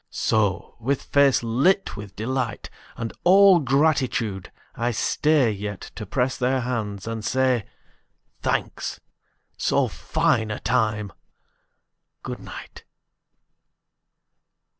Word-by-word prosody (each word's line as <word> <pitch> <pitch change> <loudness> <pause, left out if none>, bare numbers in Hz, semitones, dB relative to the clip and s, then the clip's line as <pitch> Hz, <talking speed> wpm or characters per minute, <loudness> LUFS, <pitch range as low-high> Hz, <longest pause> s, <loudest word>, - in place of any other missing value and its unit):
So, 100 -5 0
with 130 +4 -1
face 140 -3 +3
lit 140 - +2
with 105 -1 -9
delight 120 +1 -3 0.3
And 115 -1 -4
all 190 0 +7
gratitude, 130 - 0 0.2
I 120 +1 -1
stay 140 +2 +2
Yet 100 -1 -6
to 110 - -7
press 130 +4 0
their 130 +1 +1
hands 110 -5 -3
and 115 -1 -4
say, 130 -2 +1 0.8
"Thanks. - - -2 0.6
So - - +2
fine 110 -1 0
a 105 - -4
time! 105 -3 0 1.1
Good - - -5
night. - - -10
120 Hz, 100 wpm, -24 LUFS, 105-135 Hz, 1.1 s, all